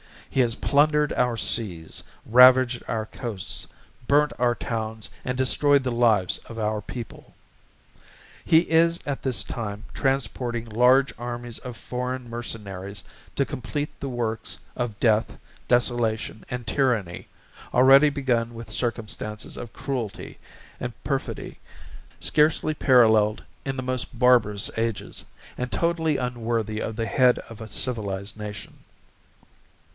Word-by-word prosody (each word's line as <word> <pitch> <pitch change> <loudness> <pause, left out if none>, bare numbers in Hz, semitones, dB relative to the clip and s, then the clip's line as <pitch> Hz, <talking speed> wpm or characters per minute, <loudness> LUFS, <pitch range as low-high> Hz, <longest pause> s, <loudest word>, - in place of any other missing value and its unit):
He - - -1
has 120 -3 +3
plundered 150 +1 +3
our 125 -1 +1
seas, 90 -10 -2 0.2
ravaged 125 +1 +6
our 110 -1 -2
Coasts, 110 -4 -4 0.4
burnt 150 +1 +4
our 120 -1 +3
towns, 110 -2 -4 0.2
and 125 0 -2
destroyed 140 +2 +3
the 130 - -1
lives 115 -6 +3
of 115 - -10
our 105 -1 -1
people. 115 +1 -9 1.1
He 160 - +6
is 165 0 +3
at 140 -2 -3
this 130 -3 +3
time 105 -2 -5
transporting 125 -3 -1
large 125 +5 +4
armies 120 -1 -5
of 125 -2 -8
foreign 125 0 -4
mercenaries 100 -4 -6 0.3
to 140 - +2
compleat 145 +3 -4
the 140 - -4
works 115 -3 -2 0.2
of 120 -5 -3
death, 110 -2 +2 0.3
desolation 120 -3 0
and 125 -1 -4
tyranny, 115 -9 0 0.5
already 135 +4 +7
begun 120 -5 -1
with 115 -1 -8
circumstances 110 -2 -3
of 120 - -8
Cruelty 125 -7 -5 0.4
& - - -6
perfidy - - -3 0.6
scarcely 155 0 +2
paralleled 110 -6 +4 0.2
in 135 -1 -2
the 130 - -4
most 130 -1 -3
barbarous 115 -5 +3
ages, 115 -2 -2 0.3
and 125 0 -3
totally 165 -3 +1
unworthy 115 -3 -2
of 110 - -3
the 115 0 -2
Head 125 +1 +4
of 115 -1 -10
a 110 - -6
civilized 100 -5 -2
nation. 105 -1 -8
120 Hz, 125 wpm, -25 LUFS, 110-130 Hz, 1.1 s, already